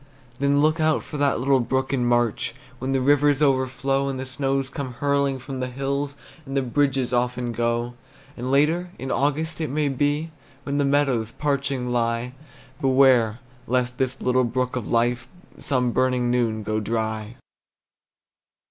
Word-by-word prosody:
Then 140 Hz, +1 st, +3 dB
look 155 Hz, +1 st, +2 dB
out 155 Hz, -1 st, +2 dB
for 150 Hz, -, -7 dB
the 140 Hz, -1 st, +2 dB
little 135 Hz, +2 st, +3 dB
brook 130 Hz, +3 st, -1 dB
in 125 Hz, -3 st, +1 dB
March, 120 Hz, -1 st, +1 dB, 0.2 s
When 130 Hz, +1 st, -2 dB
the 135 Hz, -1 st, +1 dB
rivers 145 Hz, +1 st, +4 dB
overflow, 135 Hz, -1 st, +1 dB
And 135 Hz, -1 st, -4 dB
the 130 Hz, -, -4 dB
snows 135 Hz, 0 st, -1 dB
come 130 Hz, -1 st, -5 dB
hurrying 140 Hz, +1 st, +1 dB
from 130 Hz, 0 st, -7 dB
the 130 Hz, -, -2 dB
hills, 140 Hz, +2 st, -3 dB, 0.3 s
And 135 Hz, -1 st, -4 dB
the 135 Hz, -, +2 dB
bridges 130 Hz, -1 st, 0 dB
often 125 Hz, 0 st, 0 dB
go. 120 Hz, +1 st, -1 dB, 0.4 s
And 125 Hz, +1 st, -4 dB
later, 155 Hz, +6 st, +2 dB
in 130 Hz, -, -5 dB
August 155 Hz, +3 st, 0 dB
it 155 Hz, -, -1 dB
may 150 Hz, +1 st, 0 dB
be, 145 Hz, +4 st, 0 dB, 0.3 s
When 140 Hz, +1 st, -2 dB
the 145 Hz, -, +2 dB
meadows 135 Hz, -6 st, +1 dB
parching 140 Hz, -3 st, -1 dB
lie, 120 Hz, +1 st, 0 dB, 0.5 s
Beware, 130 Hz, -4 st, +4 dB, 0.3 s
lest 125 Hz, 0 st, 0 dB
this 130 Hz, 0 st, -1 dB
little 125 Hz, 0 st, +2 dB
brook 125 Hz, +1 st, -1 dB
of 125 Hz, -4 st, -4 dB
life 120 Hz, +1 st, +1 dB, 0.3 s
Some 125 Hz, -3 st, 0 dB
burning 125 Hz, -1 st, +1 dB
noon 115 Hz, -3 st, 0 dB
go 110 Hz, +1 st, -1 dB
dry! 110 Hz, 0 st, -3 dB
130 Hz, 160 wpm, -24 LUFS, 120-140 Hz, 0.5 s, rivers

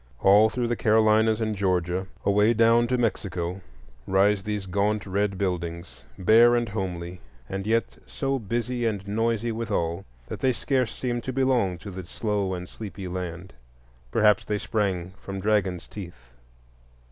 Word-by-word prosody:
All 105 Hz, +3 st, +6 dB
through 120 Hz, +1 st, -2 dB
the 120 Hz, -, 0 dB
Carolinas 110 Hz, 0 st, +3 dB
and 110 Hz, -1 st, -1 dB
Georgia, 90 Hz, -1 st, 0 dB, 0.2 s
away 105 Hz, +3 st, +4 dB
down 115 Hz, +1 st, +4 dB
to 125 Hz, +1 st, +1 dB
Mexico, 95 Hz, -5 st, -2 dB, 0.5 s
rise 100 Hz, +1 st, +3 dB
these 105 Hz, -1 st, -3 dB
gaunt 100 Hz, +2 st, 0 dB
red 100 Hz, 0 st, -1 dB
buildings, 85 Hz, -3 st, -4 dB
bare 115 Hz, +5 st, +6 dB
and 120 Hz, -1 st, +1 dB
homely, 90 Hz, -3 st, -4 dB, 0.3 s
and 95 Hz, +5 st, -4 dB
yet 115 Hz, +1 st, 0 dB
so 135 Hz, -1 st, -2 dB
busy 120 Hz, +3 st, -2 dB
and 100 Hz, -3 st, -3 dB
noisy 115 Hz, +2 st, 0 dB
withal 95 Hz, -6 st, -2 dB, 0.2 s
that -, -, -7 dB
they 130 Hz, -1 st, +2 dB
scarce 130 Hz, -3 st, 0 dB
seem 120 Hz, -2 st, -2 dB
to 130 Hz, -, -4 dB
belong 125 Hz, -8 st, +1 dB
to 100 Hz, +3 st, -9 dB
the 95 Hz, 0 st, -7 dB
slow 100 Hz, +1 st, -2 dB
and 90 Hz, 0 st, -7 dB
sleepy 100 Hz, -3 st, -8 dB
land. 90 Hz, 0 st, -6 dB, 0.6 s
Perhaps 105 Hz, -3 st, +3 dB
they 105 Hz, -, -1 dB
sprang 95 Hz, -5 st, -2 dB
from 95 Hz, 0 st, -6 dB
dragons' 95 Hz, -3 st, 0 dB
teeth. 85 Hz, -, -10 dB
105 Hz, 150 wpm, -26 LUFS, 95-115 Hz, 0.6 s, All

